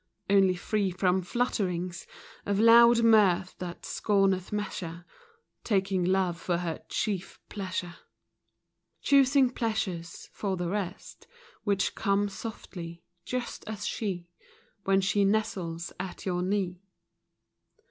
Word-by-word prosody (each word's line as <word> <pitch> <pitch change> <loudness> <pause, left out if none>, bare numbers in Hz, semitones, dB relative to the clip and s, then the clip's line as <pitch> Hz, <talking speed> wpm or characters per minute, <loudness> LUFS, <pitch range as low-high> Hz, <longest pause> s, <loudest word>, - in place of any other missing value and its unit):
Only 195 -2 +5
free 200 +2 0
from 185 +1 +1
flutterings 180 -5 -2 0.4
Of 200 0 0
loud 235 +1 +7
mirth 195 -5 +4
that 180 -1 -6
scorneth 195 -3 +1
measure, 175 -5 -4 0.3
— 460 0 -42
Taking 190 -2 +2
love 180 -1 +1
for 175 -2 0
her 170 -2 -4
chief 190 -3 -2
pleasure; 185 -3 -4 1.1
Choosing 275 -2 +5
pleasures 190 -9 -3
(for 195 -3 -2
the 175 -1 -2
rest) 195 -2 -5 0.4
Which 200 -2 +1
come 200 +1 +1
softly, 175 -6 -8
— 175 - -49
just 250 -1 -3
as 215 -1 -5
she, 185 -6 -3 0.6
When 195 0 +3
she 200 +1 +2
nestles 190 -5 -1
at 185 -1 -6
your 180 -2 0
knee. 185 -1 -1
195 Hz, 115 wpm, -28 LUFS, 180-210 Hz, 1.1 s, loud